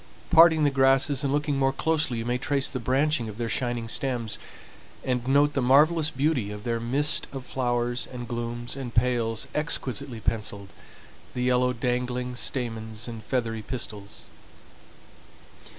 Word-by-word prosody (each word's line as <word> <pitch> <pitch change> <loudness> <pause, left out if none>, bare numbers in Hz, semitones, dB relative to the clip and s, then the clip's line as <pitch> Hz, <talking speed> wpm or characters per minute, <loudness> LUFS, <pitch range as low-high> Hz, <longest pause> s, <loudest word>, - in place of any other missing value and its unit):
Parting 160 -1 +7
the 145 - +3
grasses 135 +1 +3
and 140 - 0
looking 145 -1 0
more 135 0 +3
closely 155 -3 0
you 115 - -3
may 125 +1 0
trace 140 +1 +1
the 130 - -4
branching 130 0 +1
of 105 - -9
their 120 -1 -2
shining 120 0 -2
stems, 120 -2 -2 0.6
and 125 -1 -1
note 145 +2 +4
the 135 - 0
marvelous 150 +5 +4
beauty 140 -7 0
of 105 0 -7
their 115 -1 -1
mist 135 +6 +2
of 135 -2 -7
flowers, 120 -1 -1
the 125 - -7
glumes 120 0 -5
and 130 -4 -6
pales 115 -2 +1
exquisitely 140 -5 -1
penciled, 105 -3 -3 0.7
the 125 - -1
yellow 125 0 +3
dangling 125 +1 -2
stamens, 110 -4 -3
and 115 -2 -7
feathery 115 -1 -2
pistils. 105 -3 -6
125 Hz, 150 wpm, -26 LUFS, 115-135 Hz, 0.7 s, Parting